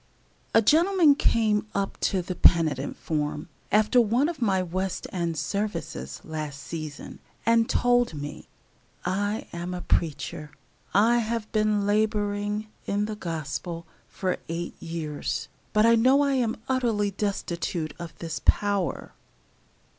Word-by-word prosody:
A 225 - +7
gentleman 335 - +5
came 215 -5 +2
up 200 0 -1
to 185 -2 +1
the 185 - -4
penitent 160 -6 +3
form, 150 +1 -2 0.2
after 215 +4 +5
one 240 +7 +2
of 320 -6 -6
my 190 -5 +2
West 185 +2 -3
end 170 -3 -2
services, 150 - -3
last 155 -3 -5
season, 155 -1 -7 0.3
and 230 0 +4
told 245 -6 +3
me: 145 0 -7 0.6
"I 205 +4 -1
am 175 +1 -4
a 180 - -5
preacher. 155 -1 -1 0.4
I 230 +4 +4
have 230 -1 -2
been 215 -1 +2
laboring 210 0 0 0.2
in 205 +1 +1
the 215 0 -4
Gospel 165 -1 -4 0.2
for 185 -2 -2
eight 170 +1 -3
years, 165 -3 -4 0.2
but 215 +1 +4
I 230 - +6
know 260 +5 +5
I 280 -1 +2
am 240 -4 +1
utterly 230 -6 +1
destitute 175 -5 -2
of 170 -1 -8
this 165 -1 -5
power." 200 -3 +1
200 Hz, 130 wpm, -26 LUFS, 165-220 Hz, 0.6 s, A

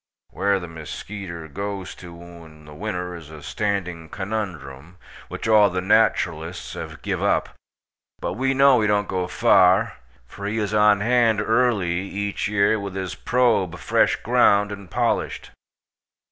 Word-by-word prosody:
Whare 100 +1 +1
the 85 - -7
muskeeter 85 +1 -8
goes 100 +3 -5
to 85 -2 -12
in 80 -3 -14
the 75 - -12
winter 90 0 -4
iz 80 -3 -11
a 80 -2 -11
standing 90 -6 -3
konumdrum, 90 -8 -5 0.3
which - - -6
all 105 -2 +6
the 90 0 -2
naturalists 90 -4 +1
hav - - -8
giv - - -2
up, - - +1 0.7
but - - -3
we 135 +1 0
kno 135 -3 +5
he 105 - +2
dont 105 -1 +1
go 90 -1 -2
far, 100 0 +3 0.3
for 100 +11 -7
he 105 +2 -2
iz 105 -1 -2
on 105 -1 +4
hand 115 -1 +3
early 105 -6 +1
each 100 +1 -3
year 105 +1 +2
with 100 -2 -6
hiz 95 -2 -4
probe 115 -8 +1
fresh - - +2
ground, 100 0 +3
and 100 -3 -9
polished. - - -1
100 Hz, 150 wpm, -23 LUFS, 85-105 Hz, 0.7 s, all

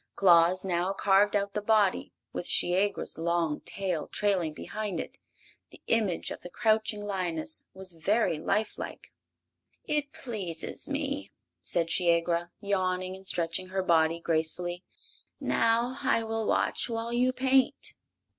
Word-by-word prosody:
Claus 180 0 +5
now 180 +1 0
carved 200 +1 +3
out 200 0 0
the 210 - -1
body, 210 -2 +2 0.2
with - - -2
Shiegra's 190 0 +1
long 165 -2 0
tail 185 -5 -2
trailing 190 -6 +1
behind 205 +3 -5
it. - - -7 0.5
The - - -16
image 215 -7 +1
of - - -7
the 175 - -9
crouching 215 +1 +1
lioness 185 - -3
was 190 -1 -2
very 180 0 +1
life 215 +7 -1
like. - - -8 0.7
"It 295 -1 -1
pleases 195 -10 -4
me," 285 0 -3 0.3
said 165 -1 0
Shiegra, 170 0 +2
yawning 185 -2 -1
and 190 0 -11
stretching 170 +1 0
her 190 0 -2
body 165 -1 +3
gracefully. 170 +2 -1 0.6
"Now 230 +2 +1
I 230 - +2
will 225 -1 -2
watch - - +1
while 230 0 -3
you 250 +1 +3
paint." 265 0 +1
190 Hz, 135 wpm, -29 LUFS, 170-220 Hz, 0.7 s, Claus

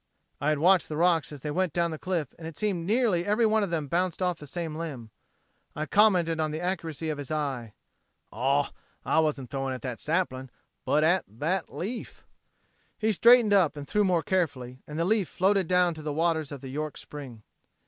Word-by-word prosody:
I 145 - +1
had 155 - +2
watched 180 +4 +4
the 150 - -3
rocks 165 -3 +2
as 145 -3 -9
they 150 - -3
went 180 0 0
down 170 -1 +1
the 155 - -6
cliff 170 -7 -2
and 160 - -7
it 165 - -9
seemed 185 -5 -1
nearly 215 -6 +2
every 210 +4 +2
one 220 0 +3
of 200 - -1
them 160 -4 -2
bounced 175 +3 0
off 180 -3 0
the 150 - -10
same 165 0 -4
limb. 140 -9 -6 0.6
I 155 - -2
commented 180 -5 +3
on 155 -1 +1
the 155 +1 -4
accuracy 165 -3 -3
of 150 - -5
his 140 - -6
eye. 135 -8 -3 0.6
"Aw! 135 +5 +1 0.3
I - - +3
wasn't 145 -6 -1
throwing 135 -1 -2
at 125 - -10
that 125 -3 -4
sapling, 145 -6 -1 0.4
but 150 - +2
at 175 +4 +3
that 155 - -2
leaf." 225 +7 -6 0.7
He 220 0 +1
straightened 230 +1 +6
up 180 -7 +3
and 145 -1 -7
threw 210 - +2
more 180 -4 +2
carefully; 135 -10 -2
and 150 - -6
the 165 - +1
leaf 205 -2 +1
floated 190 -1 +2
down 180 -1 +3
to 155 - -9
the 150 0 -3
waters 160 -1 0
of 140 -3 -7
the 135 - -8
York 150 +2 -4
spring. 130 -7 -9
160 Hz, 210 wpm, -27 LUFS, 145-185 Hz, 0.7 s, straightened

